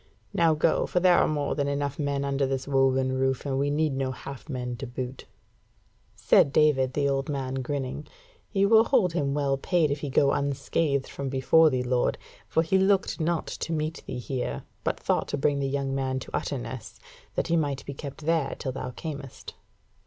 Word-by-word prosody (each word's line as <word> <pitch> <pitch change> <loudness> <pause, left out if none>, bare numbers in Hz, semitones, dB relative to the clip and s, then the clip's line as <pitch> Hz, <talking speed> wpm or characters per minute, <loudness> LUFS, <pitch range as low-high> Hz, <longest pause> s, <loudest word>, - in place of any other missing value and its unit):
Now 165 -2 +3
go, 155 +1 +2
for 180 - +1
there 180 -1 +5
are - - +3
more 145 -2 -1
than 140 -1 -1
enough 140 0 -2
men 140 -1 -1
under 140 0 0
this 135 0 -3
woven 135 -1 +2
roof, 130 0 0
and 135 -1 -1
we 140 +1 +1
need 150 0 +1
no 135 -1 -1
half 135 +1 -9
men 125 -2 -3
to 135 - -6
boot." 125 +1 -6 0.9
Said 140 - +4
David, 135 -4 +3
the 140 0 +1
old 135 0 -1
man, 135 -2 -2
grinning: 140 +2 -4 0.4
"He 195 -2 +2
will 220 +2 +6
hold 220 -11 +2
him 140 -4 0
well 140 -2 +1
paid 160 +1 +1
if 140 - -1
he 145 - -4
go 140 +1 +3
unscathed 140 0 0
from 140 -1 -5
before 135 +5 +5
thee, 130 -3 -1
lord: 125 0 +1 0.3
for 160 - +2
he 190 +4 +2
looked 190 -1 +2
not 165 0 0
to 165 - -4
meet 155 +1 -2
thee - - -4
here, 125 - -3 0.2
but - - -1
thought - - 0
to - - -2
bring 145 0 +1
the 135 - 0
young 135 -1 -1
man 130 -1 -1
to - - -6
Utterness, - - -5 0.4
that - - -1
he 170 - +3
might 145 -4 -1
be 140 - -5
kept 140 +1 -8
there 165 -2 +1
till 130 - -3
thou 130 0 -5
camest." 140 0 -7
140 Hz, 200 wpm, -27 LUFS, 135-155 Hz, 0.9 s, will